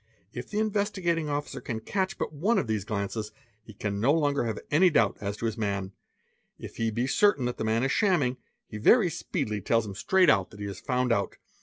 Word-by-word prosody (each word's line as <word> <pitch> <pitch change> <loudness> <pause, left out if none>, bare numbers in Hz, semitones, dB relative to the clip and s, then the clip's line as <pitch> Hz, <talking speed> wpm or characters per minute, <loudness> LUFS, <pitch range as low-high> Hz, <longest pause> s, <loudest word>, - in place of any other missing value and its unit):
If - - -7
the 210 - -4
In 215 0 +1
stigating 175 -6 0
Officer 145 0 -3
can 115 -3 -4
catch 190 - -2
but - - -3
one 195 +11 +1
of - - +1
these 110 -3 -2
glances, 105 0 -3 0.3
he 110 -1 -14
can 100 0 -3
no 120 +7 +3
longer 145 -6 +1
ve 110 - -6
any 175 +5 +5
doubt 115 - +2
as 100 0 -3
to 115 - -4
his 115 0 -2
man; 100 -3 -2 0.7
if - - -10
he 115 0 0
be 115 +3 -1
certain 145 -1 +3
the 125 -2 -3
man 110 +2 +1
is 135 - +1
shamming, 155 - +2 0.3
he 105 - -8
y 215 - +5
speedily 140 - -3
tells 115 +3 +1
him 100 - -6
straight 185 - +3
that 100 -4 +2
he 100 - -4
is 100 -2 -6
found 125 -1 0
out. 100 -3 -2
120 Hz, 215 wpm, -27 LUFS, 105-165 Hz, 0.7 s, any